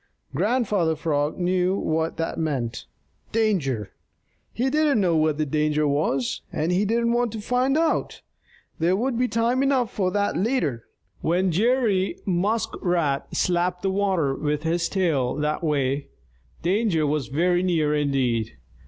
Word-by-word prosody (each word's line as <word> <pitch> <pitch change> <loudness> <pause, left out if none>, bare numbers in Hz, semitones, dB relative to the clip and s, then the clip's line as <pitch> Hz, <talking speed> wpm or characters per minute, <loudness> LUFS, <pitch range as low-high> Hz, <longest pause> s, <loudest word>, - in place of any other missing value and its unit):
Grandfather 205 -8 +1
Frog 150 -2 -1
knew 180 +1 +1
what 160 -1 -1
that 165 0 -3
meant 130 -7 -2 0.4
danger! 155 - 0 0.6
He 250 +3 -1
didn't 300 -4 +3
know 180 -4 +2
what 155 -1 +2
the 155 - 0
danger 150 +1 +1
was, 140 -3 0
and 160 +3 -1
he 190 +3 +2
didn't 235 +2 +1
wait 240 0 +1
to 220 - -4
find 250 +6 +1
out. 325 0 0 0.6
There 170 +3 +2
would 245 +5 -1
be 250 +2 +1
time 235 +2 +1
enough 270 -4 +1
for 190 -3 0
that 205 +1 0
later. 180 - -1 0.4
When 180 +3 +1
Jerry 210 -1 +1
Muskrat 175 -6 0
slapped 180 +1 0
the 195 - +1
water 190 -8 +1
with 150 +2 -2
his 170 +1 0
tail 155 -10 0
that 150 +3 -1
way, 140 -2 0 0.6
danger 180 -3 +1
was 145 -2 -1
very 175 +5 +1
near 165 -5 +1
indeed. 130 -6 0
175 Hz, 145 wpm, -24 LUFS, 150-210 Hz, 0.6 s, didn't